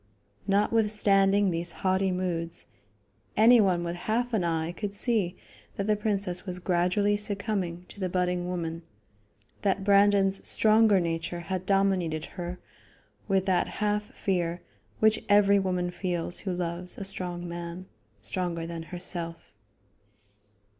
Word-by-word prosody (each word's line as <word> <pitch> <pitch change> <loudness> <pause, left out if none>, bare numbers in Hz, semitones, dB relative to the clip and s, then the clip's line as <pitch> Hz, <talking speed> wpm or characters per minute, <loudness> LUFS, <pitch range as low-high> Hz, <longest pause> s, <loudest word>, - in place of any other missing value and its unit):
Notwithstanding 205 -1 +3
these 170 +1 -2
haughty 190 0 +2
moods, 175 -2 -3 0.7
anyone 210 -6 +5
with 170 0 -3
half 230 +7 -1
an 210 -5 +1
eye 165 -1 -1
could 200 +3 -5
see 205 -6 0 0.4
that 200 - -2
the 215 0 +2
princess 200 -4 -1
was 180 -2 -3
gradually 180 +3 +1
succumbing 200 -4 -2
to - - -13
the 185 -2 -1
budding 180 0 0
woman; 165 -2 -3 0.8
that 195 -1 0
Brandon's 200 -1 +4
stronger 215 -2 +5
nature 170 0 -3
had 185 +1 -4
dominated 190 -5 +1
her 175 0 -5 0.7
with 195 -2 +1
that 185 -2 +2
half 210 0 -1
fear 175 -3 -1 0.4
which 220 0 +3
every 200 -1 +5
woman 180 -2 -1
feels 175 -2 -2
who 195 - -3
loves 175 0 -4
a - - -5
strong 175 -2 -3
man 170 +1 -6 0.4
stronger 170 - -3
than 165 0 -5
herself. 175 -2 -3
185 Hz, 125 wpm, -28 LUFS, 175-200 Hz, 0.8 s, anyone